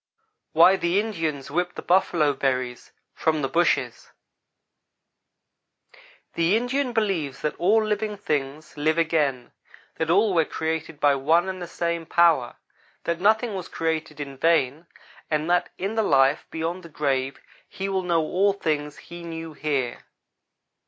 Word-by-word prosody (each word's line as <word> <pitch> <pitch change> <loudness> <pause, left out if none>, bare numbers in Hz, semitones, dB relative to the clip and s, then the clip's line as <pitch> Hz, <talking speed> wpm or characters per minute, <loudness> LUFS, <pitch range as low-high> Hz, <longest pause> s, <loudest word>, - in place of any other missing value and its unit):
WHY 180 +4 +6
THE 175 +2 +1
INDIANS 160 -11 -3
WHIP 180 +3 -1
THE - - -7
BUFFALO 170 -5 +3
BERRIES 130 -2 -2 0.2
FROM 155 -2 0
THE - - +1
BUSHES 170 +6 0 2.2
THE 170 +5 +2
Indian 250 +2 -1
believes 175 - -1
that 150 - -1
all 215 +5 +3
things 155 -9 -3
live 155 +2 +1
again; 150 -7 0 0.5
that 160 - -1
all 200 +3 +4
were 165 -2 +4
created 160 0 -4
by 145 -1 +4
one 160 +6 +2
and 185 -1 -5
the 175 - -5
same 170 -1 -3
power; 165 -8 +3 0.5
that 170 +1 -2
nothing 220 +2 +3
was 185 -2 -5
created 160 -2 -3
in 140 -2 -6
vain; 160 0 +1 0.4
and 155 0 0
that 180 - +2
in 195 +3 -3
the 225 - +1
life 135 -7 +3
beyond 165 +3 -3
the 170 - -12
grave 135 -3 -1 0.3
he 195 - -4
will 190 -1 0
know 170 -2 +1
all 190 +6 +2
things 150 -5 -2
that - - -14
he 175 0 -10
knew 165 -1 -7
here. 140 -5 -2
165 Hz, 145 wpm, -24 LUFS, 145-185 Hz, 2.2 s, WHY